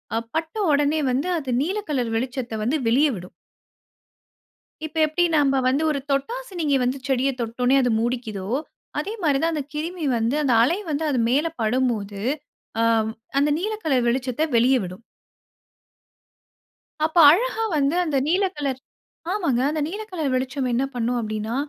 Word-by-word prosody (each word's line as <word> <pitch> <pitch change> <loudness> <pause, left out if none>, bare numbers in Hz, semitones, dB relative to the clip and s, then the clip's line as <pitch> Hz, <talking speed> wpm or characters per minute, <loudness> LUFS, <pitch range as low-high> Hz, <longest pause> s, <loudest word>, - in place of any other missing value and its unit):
அ - - +2 0.2
பட்ட 320 +2 -2 0.2
ஒடனே 290 +2 +2
வந்து 270 +7 0
அது 275 -5 -5
நீல 370 +8 -1
கலர் 250 -6 -1
வெளிச்சத்த 250 0 -3
வந்து 255 +8 +1
வெளிய 265 +7 +4
விடும். 180 -1 -9 1.5
இப்ப 315 +1 -8
எப்டி 315 +3 0
நம்ப 275 -2 +3
வந்து 275 +4 +1
ஒரு 285 - -1
தொட்டாசினிங்கி 340 - -1
வந்து 250 +2 0
செடிய 265 0 +2
தொட்ட 235 +1 -3
உடனே 255 +2 +4
அது 250 - +1
மூடிக்கிதோ, 230 -5 -3 0.5
அதே 395 +8 -3
மாரி 290 -4 +3
தான் 330 0 +1
அந்த 300 -3 -2
கிருமி 325 +2 -3
வந்து 230 +4 0
அந்த 265 -4 +2
அலை 330 +9 +2
வந்து 300 +1 -1
அது 265 -4 +1
மேல 290 +6 +2
படும்போது, 215 -4 0 0.6
அ - - +3 0.6
அந்த 290 +1 +3
நீல 425 +5 -2
கலர் 260 -6 +2
வெளிச்சத்த 255 +3 0
வெளிய 245 +3 +5
விடும். 185 +4 -8 2.0
அப்ப 315 +2 -3
அழகா 450 +5 +1
வந்து 285 +2 +2
அந்த 300 -4 0
நீல 370 +5 +2
கலர் 275 -3 -2 0.5
ஆமாங்க. 335 - 0
அந்த 310 0 -2
நீல 405 +6 -5
கலர் 315 -7 -1
வெளிச்சம் 255 +1 -1
என்ன 240 +3 +1
பண்ணும் 245 +1 0
அப்டின்னா, 215 0 -3
275 Hz, 155 wpm, -23 LUFS, 245-315 Hz, 2.0 s, வெளிய